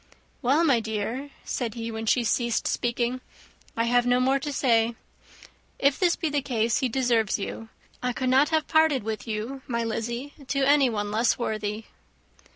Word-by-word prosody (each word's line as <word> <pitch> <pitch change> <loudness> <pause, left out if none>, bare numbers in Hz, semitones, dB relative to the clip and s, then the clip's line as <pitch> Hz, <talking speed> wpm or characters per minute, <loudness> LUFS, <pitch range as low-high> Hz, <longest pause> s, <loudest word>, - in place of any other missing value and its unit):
"Well, 280 +5 +3
my 275 -8 +4
dear," 225 +5 -3 0.2
said 235 -3 -3
he, 230 -1 -4
when 225 0 -5
she 245 +2 +3
ceased 235 +1 0
speaking, 240 +1 -1 0.6
"I 230 - +2
have 245 +1 +2
no 245 0 +3
more 265 +2 +2
to 290 +2 -4
say. 235 -4 +2 0.8
If 280 0 +2
this 355 -2 +3
be 325 - -2
the 290 -1 0
case, 230 -3 0
he 260 - 0
deserves 235 -4 +1
you. 220 +2 -6 0.3
I 250 - 0
could 255 +1 -2
not 270 +3 +4
have 315 -1 +1
parted 315 -6 +3
with 220 +1 -4
you, 225 +5 -4
my 235 -2 -1
Lizzy, 235 +5 -4
to 275 +1 0
anyone 245 -8 +3
less 225 +3 +2
worthy." 215 -2 -3
240 Hz, 170 wpm, -26 LUFS, 225-270 Hz, 0.8 s, my